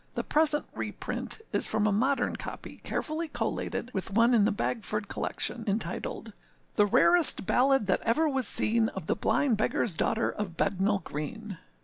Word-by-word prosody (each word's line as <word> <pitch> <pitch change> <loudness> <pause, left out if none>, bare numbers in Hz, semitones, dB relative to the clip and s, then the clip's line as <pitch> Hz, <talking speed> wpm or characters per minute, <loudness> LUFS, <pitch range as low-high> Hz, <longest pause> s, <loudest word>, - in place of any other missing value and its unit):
The - - -2
present 300 -1 +2
reprint - - -4
is - - +2
from 215 -1 0
a 215 - +2
modern 260 +7 +1
copy, - - -8
carefully 320 +2 -3
collated 255 -4 -4
with 190 - -2
one 230 +5 +3
in 215 -4 +4
the 220 - +2
Bagford 210 0 -3
Collection, - - -2
entitled, 215 +1 -3 0.4
âThe 205 -1 +3
rarest 345 - +4
ballad 270 0 +3
that 185 - +1
ever 310 +8 +1
was 265 -4 +1
seen, 225 0 +3
Of 190 -4 -7
the - - 0
Blind 250 -8 +1
Beggarâs 215 -3 0
Daughter 225 +7 0
of 195 -5 -6
Bednal 200 0 0
Green. 195 +7 -6
220 Hz, 160 wpm, -28 LUFS, 205-270 Hz, 0.4 s, in